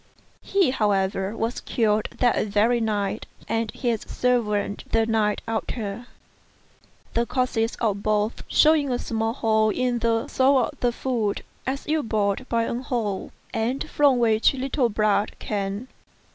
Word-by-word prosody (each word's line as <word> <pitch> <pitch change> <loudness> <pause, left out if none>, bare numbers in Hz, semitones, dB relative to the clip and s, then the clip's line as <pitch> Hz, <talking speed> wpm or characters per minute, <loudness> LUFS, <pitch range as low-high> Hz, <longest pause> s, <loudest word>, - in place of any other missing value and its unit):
He, 390 -9 +2
however, 200 -2 0
was 230 +2 -2
killed 215 -2 +1
that 245 -3 +2
very 220 +4 +2
night, 210 -1 -1 0.2
and 225 -1 -1
his 235 -3 -1
servant 210 -5 0
the 225 0 +3
night 220 -2 +1
after; 225 0 -3 1.1
the 235 +1 +1
corpses 245 -3 0
of 205 -4 -1
both 215 +1 0
shewing 300 -3 +4
a 245 - +1
small 225 -1 -2
hole 220 -3 +2
in 245 +2 0
the 230 0 +1
sole 265 +1 +3
of 250 - -1
the 245 - +2
foot 235 -5 -1 0.3
as 270 +1 -2
if 310 0 0
bored 215 +2 0
by 230 -1 +1
an 240 +2 -3
awl, 215 -6 -2 0.2
and 245 +7 -1
from 285 -4 +3
which 225 +1 +3
a - - -8
little 260 -1 0
blood 210 -1 +1
came. 200 +3 -3
225 Hz, 145 wpm, -24 LUFS, 210-250 Hz, 1.1 s, shewing